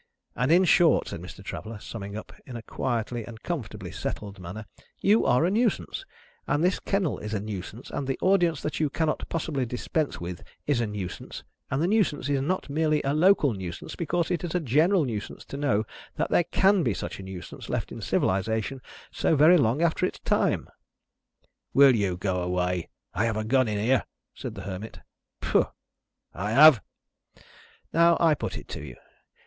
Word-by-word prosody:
and 125 +4 +1
in 180 +3 +6
short," 175 -2 +4
said - - -6
Mr. - - -10
Traveller, 110 0 -6
summing 100 -1 -7
up 110 - -9
in 125 - -7
a 115 - -6
quietly 120 -1 -2
and 115 +1 -11
comfortably 105 - -5
settled 100 -2 -5
manner, 95 +5 -7 0.3
"you 210 +3 +3
are 125 +6 +4
a 180 - +1
Nuisance, 230 - 0 0.4
and 145 +2 +1
this 180 +1 +2
kennel 195 -6 -1
is 105 +1 -4
a - - 0
Nuisance, 105 +3 -7
and 140 - -3
the 135 - -1
audience 175 -6 +2
that 150 - -2
you 155 -2 +2
cannot 155 +1 -1
possibly 155 -5 -1
dispense 125 +5 -2
with 85 +1 -6 0.2
is 140 -5 +1
a 115 - 0
Nuisance, 100 -4 -6 0.3
and 135 +4 0
the - - +2
Nuisance 185 -10 +1
is 140 -2 +1
not 180 +7 -1
merely 155 +1 +1
a 140 0 0
local 155 - +4
Nuisance, 90 -3 -6
because 170 0 -1
it 175 - -1
is 175 -1 -3
a - - +3
general 160 - +3
Nuisance 110 -5 -5
to - - -8
know 140 -7 +1 0.3
that - - -1
there 175 - +4
can 195 +3 +3
be 120 - 0
such - - -5
a - - -7
Nuisance 95 -3 -8
left - - -2
in - - -7
civilisation 110 +7 0 0.3
so - - +1
very 155 +5 +7
long 135 +5 +2
after 165 -1 +1
its - - -7
time." - - +1 1.1
"Will 135 -2 +8
you 100 -5 0
go 90 -1 -1
away? 90 -1 -1 0.2
I 110 - +1
have 110 -2 0
a 110 - -1
gun 130 +3 +3
in 105 -1 -1
here," 115 +4 +2 0.3
said - - -7
the - - -7
Hermit. 100 +3 -7 0.4
"Pooh!" - - +2 0.7
"I 95 +5 -3
have!" 145 -4 +8 1.1
"Now, 170 0 +5
I 165 -2 +5
put 150 - -4
it - - -9
to - - -6
you. 65 -5 -9
130 Hz, 185 wpm, -27 LUFS, 105-160 Hz, 1.1 s, Will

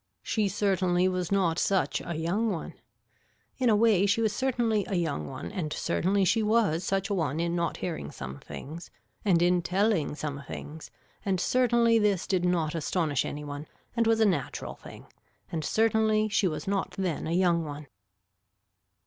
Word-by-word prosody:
She 215 -3 0
certainly 185 -2 +1
was 185 -1 -2
not 180 -4 +2
such 195 -1 +1
a 170 - -4
young 190 +8 0
one. 175 -6 -4 0.9
In 250 -2 +3
a 215 - +5
way 205 -3 +4
she 205 +3 +2
was 220 -2 +1
certainly 235 -4 +1
a 195 - -2
young 160 - -1
one 85 - -7
and 155 -4 -3
certainly 190 +5 +1
she 225 +5 +3
was 210 -6 +2
such 195 +1 -1
a - - +2
one 160 -5 -1
in 170 0 0
not 170 -1 -1
hearing 170 -3 -4
some 65 +2 -7
things 160 +5 -9 0.3
and 175 -4 +3
in 180 0 +3
telling 185 -4 +1
some 145 -2 -4
things 155 +1 -8 0.3
and 190 -2 0
certainly 235 0 +3
this 205 -4 +1
did 185 -3 0
not 170 -4 +1
astonish 160 -3 0
any 150 +1 -5
one 145 +1 -6 0.3
and 230 -1 +2
was 225 0 +3
a 220 - +5
natural 190 -5 -1
thing - - -12 0.5
and 160 -2 -2
certainly 220 +2 +2
she 215 -2 +2
was 155 +1 -4
not 195 -1 -1
then 180 -5 -2
a - - -2
young 175 -2 +3
one. 150 -1 -7
185 Hz, 175 wpm, -28 LUFS, 165-215 Hz, 0.9 s, a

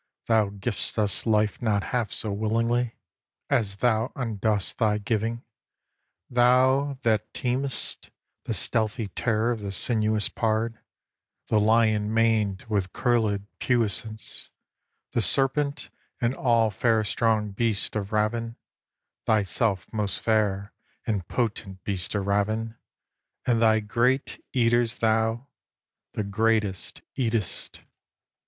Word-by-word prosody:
Thou 110 -3 +3
giv'st 100 +3 -3
us 105 +1 +1
life 105 0 +2
not 105 -4 +1
half 120 -3 0
so 110 - -1
willingly 115 +3 0 0.6
As 100 -3 +1
thou 110 +1 +1
undost 110 -5 -1
thy 105 -3 +2
giving; 115 +2 -2 0.8
thou 130 +3 +3
that 110 -2 +1
teem'st 130 +2 -1 0.4
The - - -2
stealthy 110 -1 0
terror 115 +3 0
of 115 - -2
the 100 -1 -5
sinuous 110 -1 +1
pard, 115 0 -1 0.7
The 110 - +3
lion 110 -1 +3
maned 110 -4 +1
with 100 -5 -1
curlèd 110 -5 +1
puissance, 110 -2 -1 0.6
The 115 - +1
serpent, 140 +4 +2 0.3
and 120 0 +1
all 115 -4 +2
fair 110 +2 +2
strong 110 -1 +1
beasts 110 0 -1
of 100 -2 -3
ravin, 115 +2 0 0.7
Thyself 100 -2 +1
most 105 -3 0
fair 105 -2 0 0.3
and 100 -7 -2
potent 105 -5 -3
beast 95 -1 -2
of 100 -1 -1
ravin; 110 +3 0 0.7
And 115 -2 +2
thy 110 -1 +4
great 120 +5 0
eaters 120 -2 +2
thou, 115 +2 +1 0.7
the 105 - -2
greatest, 105 -1 -1
eat'st. 115 -6 -2
110 Hz, 115 wpm, -26 LUFS, 105-115 Hz, 0.8 s, thy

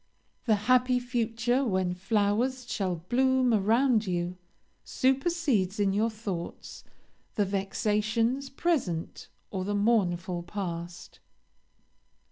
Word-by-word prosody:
The 220 -3 +4
happy 255 0 +4
future, 240 +1 0
when 185 -6 0
flowers 220 +6 0
shall 190 -6 -1
bloom 260 0 +3
around 225 +2 +3
you, 175 0 -2 0.5
supersedes 265 - +1
in 200 -1 +2
your 215 +3 +2
thoughts 205 -6 -6 0.5
the 205 - +2
vexatious 215 +6 0
present 265 - -2 0.2
or 190 -2 -2
the 205 +2 -2
mournful 185 -5 +1
past. 175 -2 -6
215 Hz, 95 wpm, -28 LUFS, 190-250 Hz, 0.5 s, The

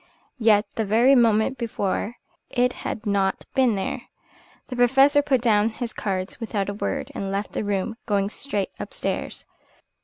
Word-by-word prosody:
Yet 215 -2 +4
the 225 - -1
very 230 +6 +4
moment 235 0 +3
before 220 -1 -2 0.3
it 250 0 +1
had 220 - -4
not 195 -2 0
been 255 -5 +3
there. 195 - -3 0.7
The 250 - -4
Professor 270 +4 +5
put 275 -4 +1
down 220 -2 +3
his 235 +1 -5
cards 190 -1 -3
without 210 -4 -2
a - - -2
word, 205 - -3
and 195 -1 -4
left 200 +1 -2
the - - -2
room, 205 +2 -1
going 200 -2 +1
straight 210 -5 -3
upstairs. - - -4
220 Hz, 155 wpm, -24 LUFS, 200-245 Hz, 0.7 s, Professor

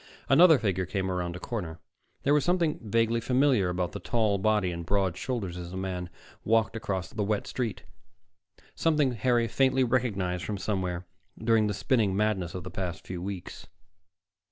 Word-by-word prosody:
Another 160 +2 +7
figure 95 -6 -1
came 95 -1 -2
around 90 -1 -2
a - - -6
corner. 90 -8 -5 0.4
There 140 - +3
was 150 - +3
something 175 -3 +1
vaguely 115 +1 +1
familiar 125 -6 +3
about 90 -2 -1
the - - -6
tall 110 -4 +1
body 105 -2 +2
and 85 0 -5
broad 95 0 0
shoulders 110 -10 -3
as 85 -1 -7
the 95 - -6
man 90 -2 -4 0.3
walked 110 0 +2
across 95 -6 -3
the 110 - -3
wet 105 0 -1
street, 120 -5 -3 0.9
something 150 -5 +2
Harry 120 0 +1
faintly 130 +2 +2
recognized 100 -8 0
from 105 +2 -3
somewhere 95 -3 -2 0.3
during 110 -1 +3
the 105 - -2
spinning 105 -4 +1
madness 100 -5 0
of 90 - -5
the - - -7
past 90 -2 -4
few 90 -1 -5
weeks. 95 -1 -6
105 Hz, 170 wpm, -28 LUFS, 90-120 Hz, 0.9 s, Another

